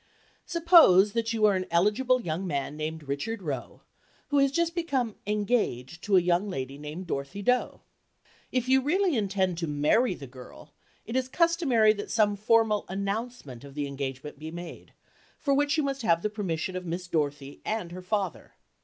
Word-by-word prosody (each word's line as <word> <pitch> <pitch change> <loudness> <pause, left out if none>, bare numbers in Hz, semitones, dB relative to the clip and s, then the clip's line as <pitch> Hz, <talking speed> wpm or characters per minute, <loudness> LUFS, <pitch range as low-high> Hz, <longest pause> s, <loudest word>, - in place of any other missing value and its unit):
Suppose 330 - +6
that 230 -1 -1
you 220 -2 +2
are 205 -2 +4
an 185 0 -2
eligible 210 +9 +2
young 170 +2 -3
man 140 -2 -2
named 155 +1 -4
Richard 145 +10 -4
Roe, 135 -6 -5 0.5
who 285 - +3
has 275 -1 +3
just 335 +3 0
become 275 - -1
"engaged" 205 - -1
to 200 -3 +4
a - - +5
young 175 +3 +1
lady 135 -4 -5
named 150 +5 -7
Dorothy 165 +6 -4
Doe. 250 +4 +1 0.7
If 255 -1 0
you 265 +1 +4
really 350 +4 +1
intend 190 -5 0
to 165 - -2
"marry 165 - +2
the 140 - -9
girl," 125 -1 -13 0.3
it 230 - -6
is 260 -1 +1
customary 285 -10 +3
that 205 -1 -7
some 210 -2 +2
formal 215 0 +2
announcement 200 - -4
of 140 -1 -12
the 145 -1 -2
engagement 140 0 -6
be 155 +1 -6
made, 175 +1 -9 0.4
for 280 - 0
which 290 +2 +2
you 310 - +2
must 275 -1 -2
have 170 -6 +2
the 210 - -1
permission 185 -4 -3
of 185 - -4
Miss 175 +1 -4
Dorothy 145 -4 -3
and 215 -6 -3
her 180 +1 -7
father. 190 -2 -3
200 Hz, 180 wpm, -27 LUFS, 160-245 Hz, 0.7 s, Suppose